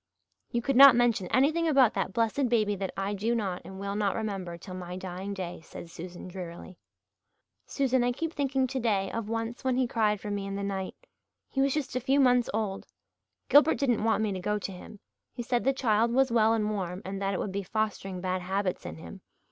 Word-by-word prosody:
"You 235 -1 -1
could 275 - 0
not 275 -2 +10
mention 235 -6 +2
anything 305 - +2
about 270 -7 +5
that 195 -1 -2
blessed 230 +5 +1
baby 215 -3 +2
that 195 -1 -3
I 195 +1 -1
do 220 +4 0
not 195 -6 -2
and 190 0 -9
will 200 0 -3
not 205 -2 0
remember 195 -6 -4
till 185 +2 -10
my 180 0 -6
dying 185 +1 -6
day," 180 -3 -6
said 165 - -10
Susan 175 +2 -8
drearily. 180 0 -8 0.9
"Susan, 260 -3 +1
I 245 - +2
keep 325 +6 -3
thinking 270 -2 0
today 225 -7 0
of 225 -2 -4
once 230 +2 -3
when 260 -1 +1
he 260 - +3
cried 215 -3 +1
for 205 - -5
me 200 -1 -3
in 195 - -4
the 200 - -3
night. 195 -1 -3 0.5
He 270 - -1
was 275 0 +2
just 285 -4 -3
a - - +2
few 270 +3 +2
months 250 -3 +4
old. 205 -2 -3 0.6
Gilbert 295 +3 +6
didn't 245 -7 +1
want 220 -1 +2
me 215 - 0
to 190 - -3
go 210 +3 -1
to 200 -1 -5
him 190 +3 -11 0.3
he 240 - -5
said 240 0 0
the 270 - +5
child 230 -3 +2
was 265 +1 +3
well 225 -1 +4
and 215 -2 0
warm 185 -1 -4
and 195 +1 -5
that 195 0 0
it - - -2
would 200 - -3
be 200 +1 -2
fostering 195 -2 -3
bad 185 0 -1
habits 190 - -2
in 80 - -6
him. 80 +1 -11
210 Hz, 220 wpm, -28 LUFS, 190-245 Hz, 0.9 s, not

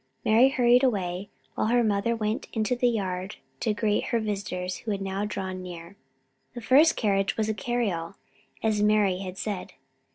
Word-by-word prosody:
Mari 230 +5 +6
hurried 250 -1 +4
away, 195 -5 -1 0.2
while - - 0
her 240 +1 +3
mother 215 +2 +1
went 215 0 -2
out - - -17
into 220 +3 +1
the 245 0 +2
yard 190 -3 -3 0.2
to 225 - 0
greet 210 0 0
her 235 - 0
visitors 190 -4 -3
who 230 - -8
had 200 -2 -1
now 195 +1 -2
drawn 190 -3 -4
near. 175 0 -9 0.6
The 240 - -6
first 280 +8 +5
carriage 195 -3 0
was 220 -1 0
a - - +1
cariole, 205 -6 -2 0.5
as 215 -2 +1
Mari 210 -3 +3
had 190 -1 -6
said. 200 -1 -4
210 Hz, 175 wpm, -26 LUFS, 190-230 Hz, 0.6 s, Mari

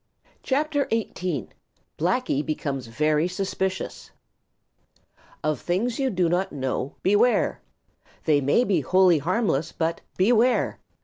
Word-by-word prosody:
CHAPTER 290 +1 0
XVIII: 185 - -2 0.5
Blacky 180 - +1
Becomes 140 -4 -3
Very 150 +7 +1
Suspicious 190 0 -3 1.3
Of 155 -4 0
things 225 +8 -1
you 270 -1 +1
do 180 -5 +1
not 180 +3 0
understand, 130 -1 -3
Beware! 205 +6 +3 0.6
They 150 -3 +3
may 140 - +3
be 190 -9 +1
wholly 185 +2 +4
harmless 165 - 0
but 165 0 -2 0.2
Beware! 235 +5 +3
180 Hz, 110 wpm, -25 LUFS, 150-225 Hz, 1.3 s, wholly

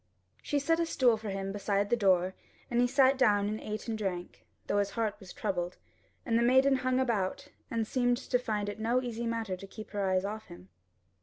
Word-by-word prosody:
She 290 - -1
set 325 +4 +2
a 335 - +2
stool 250 -7 +3
for 215 -1 -6
him 195 0 -3
beside 200 0 -1
the - - +6
door 190 -4 +3 0.4
and 240 0 +3
he 245 - +4
sat 270 +1 +4
down 205 -5 +4
and 215 +1 -2
ate 215 +2 -5
and 225 - -1
drank, 185 -5 -4 0.2
though 205 - +1
his 200 0 +1
heart 220 -2 +1
was 190 -4 -11
troubled; 175 -1 -3 0.5
and 230 -2 +2
the - - +2
maiden 265 +3 +5
hung 255 0 +1
about, 240 +2 -1 0.2
and 230 -4 -1
seemed 245 +1 +1
to 250 - 0
find 210 -4 -2
it 205 +1 -5
no 240 +3 +1
easy 235 -1 -3
matter 225 -4 -2
to 195 +2 -10
keep 215 +2 -10
her 205 -1 -2
eyes 185 0 +1
off 215 +2 -5
him. 90 +2 -13
220 Hz, 220 wpm, -31 LUFS, 200-245 Hz, 0.5 s, the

